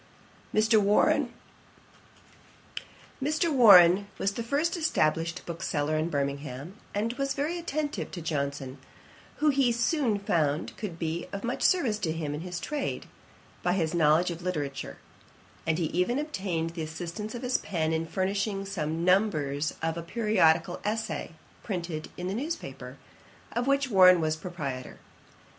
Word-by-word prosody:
Mr. 220 +1 +4
Warren 205 +1 +3 1.9
was 205 - +5
the 235 - -4
first 290 +9 0
established 165 - 0
bookseller 155 -3 -2
in 155 +2 0
Birmingham, 140 +2 -3 0.2
and 220 +3 0
was 275 0 0
very 310 +5 -1
attentive 305 -3 -3
to 180 - -7
Johnson, 140 -4 -3 0.6
who 305 - +2
he 270 -3 +3
soon 235 -1 +1
found 155 -6 0
could 195 -7 -6
be 165 0 -3
of 200 0 -5
much 240 +2 -2
service 255 - +2
to 165 -6 -1
him 155 -2 -3
in 150 - -4
his 180 0 -5
trade, 295 -2 -3 0.6
by 180 - +1
his 165 -4 0
knowledge 165 +1 +3
of 170 0 -7
literature; 145 -6 -4 0.7
and 160 0 +2
he 170 - 0
even 180 - 0
obtained 190 - -2
the 165 -1 -6
assistance 175 +8 -5
of 240 - -6
his 250 0 +1
pen 160 -4 -1
in 160 0 -1
furnishing 195 +2 -1
some 165 -4 -2
numbers 155 -7 +1
of 165 0 -1
a - - -3
periodical 170 -4 +2
Essay 205 -8 -3 0.3
printed 170 -6 -4
in 180 - -4
the 190 - -2
news 295 +10 -2
paper, - - -9 0.5
of 240 +2 -1
which 275 -2 +2
Warren 185 -2 +7
was 155 -1 0
proprietor. 145 -7 -6
180 Hz, 145 wpm, -28 LUFS, 160-225 Hz, 1.9 s, Warren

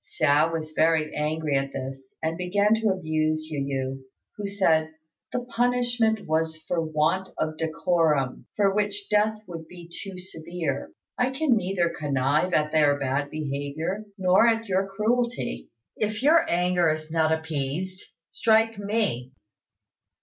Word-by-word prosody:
Hsiao 150 +3 +2
was 160 -1 -4
very 155 -1 +2
angry 150 0 -1
at 135 0 -1
this, 135 0 -7
and 160 +1 0
began 200 +4 +2
to 225 0 +1
abuse 155 -4 0
Yu 150 - -2
yü, 135 -1 -3 0.3
who 205 -1 -4
said, 160 -6 +2 0.4
"The 250 - -1
punishment 240 -3 +1
was 160 0 0
for 165 +2 -2
want 160 +4 0
of 155 0 -1
decorum, 160 -4 0
for 200 -2 +3
which 205 0 -1
death 215 +1 +2
would 165 -3 -8
be 175 -1 -12
too 185 +2 -8
severe. 165 -5 -4 0.3
I 250 +1 +3
can 265 -1 +2
neither 185 -3 +1
connive 145 +1 0
at 150 -2 +2
their 145 -2 +4
bad 140 +1 -1
behaviour, 155 +7 -3
nor 190 +4 +5
at 225 0 +1
your 190 0 +1
cruelty. 215 - -1 0.3
If 215 +2 -2
your 330 +3 +5
anger 180 -1 +2
is 155 0 -5
not 160 -1 +2
appeased, 160 +3 -2 0.3
strike 225 -1 +2
me." 200 - -1
165 Hz, 140 wpm, -26 LUFS, 155-205 Hz, 0.4 s, nor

